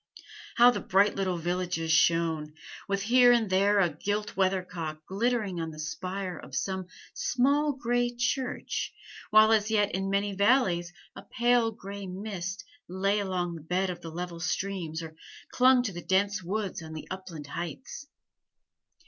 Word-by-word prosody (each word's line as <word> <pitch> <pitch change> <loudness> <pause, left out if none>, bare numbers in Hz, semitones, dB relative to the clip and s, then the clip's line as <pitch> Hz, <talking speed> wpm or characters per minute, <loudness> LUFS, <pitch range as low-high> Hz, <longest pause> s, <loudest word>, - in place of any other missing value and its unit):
How 245 0 +7
the - - -3
bright 200 +2 +3
little 185 -2 -1
villages 175 -1 -2
shone, 160 -1 +2 0.3
with 200 0 -1
here 245 +2 +6
and 230 -5 +2
there 200 +2 +4
a 180 -3 +4
gilt 205 +6 -3
weathercock 180 -5 -2
glittering 205 -3 -1
on 165 - -3
the 155 - -10
spire 185 +3 -4
of - - -10
some 190 -2 -2 0.3
small 285 +4 +1
gray 245 -2 0
church, 245 +1 -2 0.4
while 215 +1 +6
as 215 -1 +3
yet 205 -2 +2
in 195 +1 -1
many 200 +1 0
valleys 195 -5 +2 0.2
a - - -8
pale 240 -1 +2
gray 200 -2 -8
mist 190 0 -5 0.2
lay 195 +3 0
along 180 -3 -2
the 165 - -8
bed 180 +4 -1
of 175 - -8
the 165 - -7
level 170 +1 -6
streams 170 -3 -3
or 160 -1 -9 0.4
clung 255 0 +5
to 225 - -2
the 175 - -6
dense 195 +3 +1
woods 195 +1 -3
on 160 -1 -9
the 155 - -7
upland 185 -5 -7
heights! 175 - -6
190 Hz, 155 wpm, -28 LUFS, 175-215 Hz, 0.4 s, How